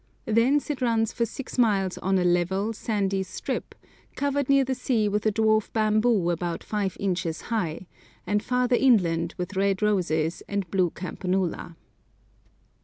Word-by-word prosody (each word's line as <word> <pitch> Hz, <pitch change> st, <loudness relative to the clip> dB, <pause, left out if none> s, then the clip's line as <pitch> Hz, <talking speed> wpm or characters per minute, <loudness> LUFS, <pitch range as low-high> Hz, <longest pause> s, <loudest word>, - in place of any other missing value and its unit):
Thence 250 Hz, +7 st, +2 dB
it 275 Hz, -, -5 dB
runs 225 Hz, -3 st, +1 dB
for 235 Hz, -1 st, 0 dB
six 260 Hz, +2 st, -7 dB
miles 195 Hz, -5 st, +2 dB
on 190 Hz, +1 st, +1 dB
a 180 Hz, -, +2 dB
level, 180 Hz, +5 st, +1 dB
sandy 200 Hz, -3 st, -1 dB
strip, 185 Hz, -, -5 dB, 0.4 s
covered 285 Hz, -1 st, -1 dB
near 275 Hz, 0 st, +5 dB
the 260 Hz, -, -1 dB
sea 235 Hz, -4 st, 0 dB
with 210 Hz, +1 st, 0 dB
a -, -, +3 dB
dwarf 220 Hz, 0 st, +2 dB
bamboo 215 Hz, -4 st, +2 dB
about 170 Hz, 0 st, -3 dB
five 200 Hz, -4 st, -2 dB
inches 180 Hz, -4 st, -2 dB
high, 180 Hz, -5 st, -2 dB, 0.4 s
and 210 Hz, 0 st, +1 dB
farther 250 Hz, +1 st, +1 dB
inland 175 Hz, -10 st, +2 dB
with 180 Hz, +2 st, -5 dB
red 195 Hz, +1 st, +1 dB
roses 170 Hz, -6 st, 0 dB
and 200 Hz, -2 st, -2 dB
blue 185 Hz, -3 st, +2 dB
campanula. 180 Hz, -1 st, -3 dB
205 Hz, 150 wpm, -26 LUFS, 180-230 Hz, 0.4 s, near